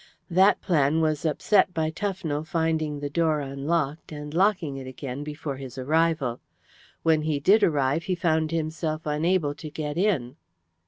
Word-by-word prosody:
That 190 +4 +4
plan 155 -3 +2
was 155 0 0
upset 185 +4 +2
by 160 -1 0
Tufnell 170 -5 -3
finding 160 -3 -1
the 145 - -2
door 160 -1 +2
unlocked, 145 +3 -2
and 150 0 -7
locking 180 -5 +2
it 130 -1 -7
again 130 +1 -6
before 150 -2 -5
his 135 -1 -9
arrival. 150 -2 +1 0.6
When 160 -1 +3
he 150 -2 -1
did 200 +9 +5
arrive 145 0 +2
he 185 - 0
found 160 -2 +1
himself 160 -1 -2
unable 155 0 +1
to 155 +1 -8
get 150 +1 -4
in." 155 - 0
155 Hz, 155 wpm, -26 LUFS, 145-165 Hz, 0.6 s, did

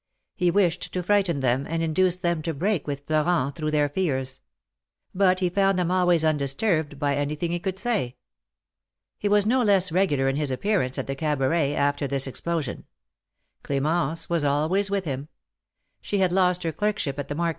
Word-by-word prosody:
He 180 -3 +2
wished 180 -2 +1
to 180 - -2
frighten 190 -6 +1
them, 130 +2 +1
and 165 0 -1
induce 175 +3 +2
them 170 -3 -1
to 160 0 -3
break 180 +1 -1
with 140 -1 -4
Florent, 155 -2 +1
through 155 -2 -2
their 150 -1 +2
fears. 135 -5 -2 0.7
But 185 -1 +2
he 180 - +3
found 195 0 +2
them 180 -1 0
always 180 -3 +3
undisturbed 155 +1 0
by 140 0 0
anything 150 +4 -2
he 175 - -1
could 190 +1 -3
say. 200 - -1 1.0
He 205 - 0
was 205 0 +3
no 250 +4 +3
less 195 -5 +3
regular 155 -7 +2
in 135 +1 0
his 150 -2 0
appearance 130 -1 0
at - - -2
the 135 - -3
Cabaret, 145 0 0
after 145 0 0
this 135 0 0
explosion. 155 +2 -4 0.8
Cl^mence 155 +3 -1
was 170 -3 0
always 155 +8 +1
with 200 -2 -1
him. 140 -1 -4 0.7
She 205 - -2
had 185 -2 +2
lost 180 -1 +2
her 165 - -1
clerkship 185 -8 -2
at 145 - -4
the 145 - -4
market. 170 +1 0
165 Hz, 180 wpm, -25 LUFS, 145-185 Hz, 1.0 s, he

